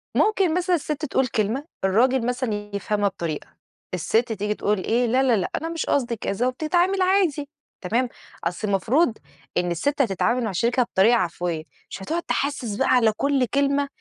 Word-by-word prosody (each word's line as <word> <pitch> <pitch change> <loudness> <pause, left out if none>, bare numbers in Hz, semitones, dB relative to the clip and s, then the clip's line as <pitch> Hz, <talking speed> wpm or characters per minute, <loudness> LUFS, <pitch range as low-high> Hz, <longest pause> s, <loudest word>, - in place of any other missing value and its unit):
ممكن 390 -6 +3
مثلًا 360 0 +2
السِت 305 -1 -3
تقول 265 -2 +1
كلمة، 230 +4 -1 0.2
الراجل 240 +6 +3
مثلًا 250 -2 -1 0.2
يفهمها 205 0 0
بطريقة، 165 -5 -4 0.5
السِت 225 +7 +1
تيجي 210 0 -2
تقول 205 -2 -1
إيه 240 +2 +2
لا، 255 +3 +2
لا، 250 -3 +4
لأ، 185 - -1
أنا 325 - -3
مش 330 -1 -3
قصدي 245 -4 0
كذا، 225 +2 -1
وبتتعامل 350 +8 +1
عادي، 365 -7 +2 0.3
تمام، 235 +6 0 0.3
أصل 175 +5 -2
المفروض 225 - +2 0.4
إن 175 0 +1
السِت 280 - 0
هتتعامل 235 +2 +1
مع 220 - -1
شريكها 235 +7 +2
بطريقة 230 +1 +3
عفوية، 175 -4 -2 0.3
مش - - -7
هتقعد 335 - -2
تحسس 275 -9 -2
بقى 265 +5 +1
على 235 -3 +5
كُلّ 280 -2 +2
كلمة 280 0 +2
245 Hz, 165 wpm, -23 LUFS, 205-285 Hz, 0.5 s, على